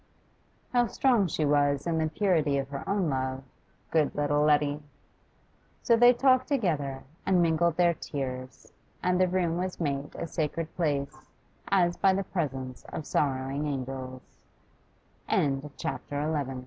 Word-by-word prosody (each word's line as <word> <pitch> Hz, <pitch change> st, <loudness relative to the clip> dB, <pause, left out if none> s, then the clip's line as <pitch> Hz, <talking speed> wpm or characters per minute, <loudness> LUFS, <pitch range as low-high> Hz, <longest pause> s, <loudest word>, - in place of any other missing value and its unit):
How 245 Hz, -1 st, +3 dB
strong 240 Hz, -8 st, +2 dB
she 155 Hz, -1 st, -1 dB
was 145 Hz, -1 st, +2 dB
in 165 Hz, -2 st, 0 dB
the 160 Hz, -, +1 dB
purity 160 Hz, -7 st, +1 dB
of 135 Hz, 0 st, -3 dB
her 140 Hz, -1 st, -5 dB
own 200 Hz, -3 st, +1 dB
love, 130 Hz, -1 st, -2 dB, 0.5 s
good 155 Hz, -3 st, +2 dB
little 145 Hz, 0 st, +1 dB
Letty! 150 Hz, -1 st, +2 dB, 1.0 s
So 235 Hz, -, +5 dB
they 240 Hz, +1 st, +7 dB
talked 255 Hz, +1 st, +3 dB
together, 155 Hz, -, -1 dB, 0.2 s
and 190 Hz, -2 st, +3 dB
mingled 170 Hz, 0 st, +2 dB
their 175 Hz, -1 st, +4 dB
tears, 130 Hz, -4 st, -6 dB, 0.3 s
and 180 Hz, 0 st, +2 dB
the 185 Hz, -, +4 dB
room 175 Hz, -2 st, 0 dB
was 185 Hz, 0 st, -3 dB
made 145 Hz, -3 st, -2 dB
a -, -, -4 dB
sacred 160 Hz, 0 st, -3 dB
place 145 Hz, -4 st, -2 dB, 0.4 s
as 175 Hz, -3 st, +2 dB
by 195 Hz, -, +4 dB
the 195 Hz, -, 0 dB
presence 135 Hz, -9 st, -4 dB
of 155 Hz, -, -6 dB
160 Hz, 125 wpm, -28 LUFS, 145-185 Hz, 1.0 s, they